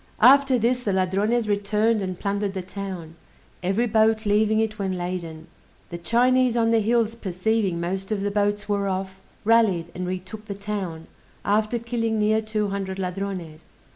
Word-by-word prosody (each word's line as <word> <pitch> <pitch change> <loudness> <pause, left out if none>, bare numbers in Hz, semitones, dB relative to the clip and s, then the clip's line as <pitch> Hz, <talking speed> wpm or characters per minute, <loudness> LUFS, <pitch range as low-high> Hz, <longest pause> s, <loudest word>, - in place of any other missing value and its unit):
After 270 +1 +7
this 240 +2 +1
the 205 -5 -1
Ladrones 200 +5 +1
returned, 210 +2 +1
and 185 -2 -4
plundered 200 -1 -2
the 190 - -3
town, 185 -4 -7 0.5
every 195 +6 +1
boat 220 -1 +2
leaving 215 +1 +3
it 215 -1 -1
when 190 -2 -1
laden. 175 -3 -5 0.5
The 170 - -5
Chinese 245 +5 +3
on 230 -1 +3
the 230 - +4
hills 225 +1 +1
perceiving 195 -2 -1
most 190 +4 -3
of 210 -2 0
the 205 0 -1
boats 205 0 0
were 200 -1 0
off, 190 0 -3 0.3
rallied, 205 -7 +3
and 180 0 -4
retook 185 +4 -6
the 200 - -5
town, 195 -5 -4 0.4
after 215 +3 +1
killing 230 -1 -1
near 215 +1 +2
two 215 -1 -2
hundred 195 -1 -3
Ladrones. 180 -4 -5
205 Hz, 165 wpm, -24 LUFS, 190-220 Hz, 0.5 s, After